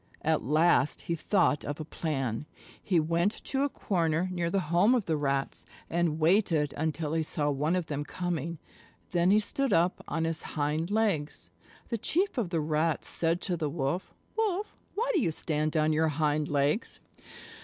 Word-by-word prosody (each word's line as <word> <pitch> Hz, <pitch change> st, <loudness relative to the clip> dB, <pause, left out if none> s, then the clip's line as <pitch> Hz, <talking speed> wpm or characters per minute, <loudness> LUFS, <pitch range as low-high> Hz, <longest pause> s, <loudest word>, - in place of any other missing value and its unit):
At -, -, +2 dB
last 155 Hz, +2 st, +3 dB
he 170 Hz, -, -3 dB
thought 175 Hz, -3 st, +2 dB
of 145 Hz, +1 st, -4 dB
a 155 Hz, -, -4 dB
plan. 140 Hz, -5 st, -3 dB, 0.3 s
He 180 Hz, -4 st, +2 dB
went 170 Hz, +6 st, +1 dB
to 270 Hz, -, -1 dB
a 285 Hz, -, +2 dB
corner 170 Hz, -, 0 dB
near 175 Hz, -2 st, -1 dB
the 195 Hz, -, +1 dB
home 205 Hz, +9 st, +5 dB
of 230 Hz, -6 st, 0 dB
the 160 Hz, -, 0 dB
Rats 140 Hz, -2 st, -1 dB, 0.3 s
and 170 Hz, -2 st, +1 dB
waited 160 Hz, -4 st, +2 dB
until 155 Hz, 0 st, -2 dB
he 165 Hz, -, +1 dB
saw 150 Hz, -1 st, 0 dB
one 150 Hz, +5 st, 0 dB
of 180 Hz, -2 st, -1 dB
them 145 Hz, -2 st, -3 dB
coming. 170 Hz, -1 st, -3 dB, 0.5 s
Then 175 Hz, 0 st, +3 dB
he 205 Hz, +2 st, +6 dB
stood 270 Hz, +4 st, -1 dB
up 175 Hz, 0 st, +2 dB
on 165 Hz, -, -1 dB
his 165 Hz, 0 st, -1 dB, 0.2 s
hind 150 Hz, +3 st, 0 dB
legs. 205 Hz, -9 st, -1 dB, 0.4 s
The 230 Hz, -, -2 dB
Chief 355 Hz, -, 0 dB
of 205 Hz, -7 st, -1 dB
the 165 Hz, -3 st, 0 dB
Rats 155 Hz, +1 st, 0 dB
said 165 Hz, +2 st, +2 dB
to 180 Hz, -, -1 dB
the 155 Hz, -3 st, -2 dB
Wolf, 145 Hz, +4 st, -2 dB, 0.2 s
"Wolf, 420 Hz, -2 st, -1 dB, 0.2 s
why 460 Hz, +4 st, 0 dB
do 350 Hz, -, +3 dB
you 170 Hz, -, +1 dB
stand 155 Hz, 0 st, -1 dB
on 155 Hz, 0 st, +3 dB
your 160 Hz, +1 st, +2 dB
hind 150 Hz, 0 st, 0 dB
legs?" 145 Hz, -, 0 dB
165 Hz, 180 wpm, -29 LUFS, 150-185 Hz, 0.5 s, he